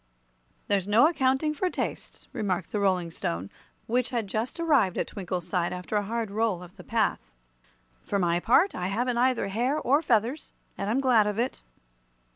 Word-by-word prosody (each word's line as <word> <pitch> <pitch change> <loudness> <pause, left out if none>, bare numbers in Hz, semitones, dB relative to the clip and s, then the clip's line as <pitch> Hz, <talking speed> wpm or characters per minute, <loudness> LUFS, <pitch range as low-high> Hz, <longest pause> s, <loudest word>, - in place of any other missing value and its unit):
"There's 200 -2 +1
no 225 +8 +6
accounting 275 -1 +1
for 365 +5 -1
tastes," - - -5
remarked 185 -5 -2
the 210 - -1
Rolling 185 -4 +1
Stone, 90 - -4 0.3
which 245 +2 0
had 235 -4 -1
just 220 - -3
arrived 280 - +3
at - - 0
Twinkle's 180 -3 -5
side 175 -3 0
after 180 +4 -5
a 210 - +3
hard 225 +1 -3
roll 210 -4 0
up 175 - -12
the - - -13
path. - - +1 0.8
"For 200 - -2
my 175 -2 +2
part, 305 - +4
I 180 - -3
haven't 240 +5 0
either 250 -5 +2
hair 245 +8 0
or 285 +1 +2
feathers, 245 +1 0 0.2
and 200 - -3
I'm 250 +5 +1
glad 235 -6 +4
of 210 0 -2
it." 245 +3 -2
220 Hz, 180 wpm, -27 LUFS, 190-255 Hz, 0.8 s, no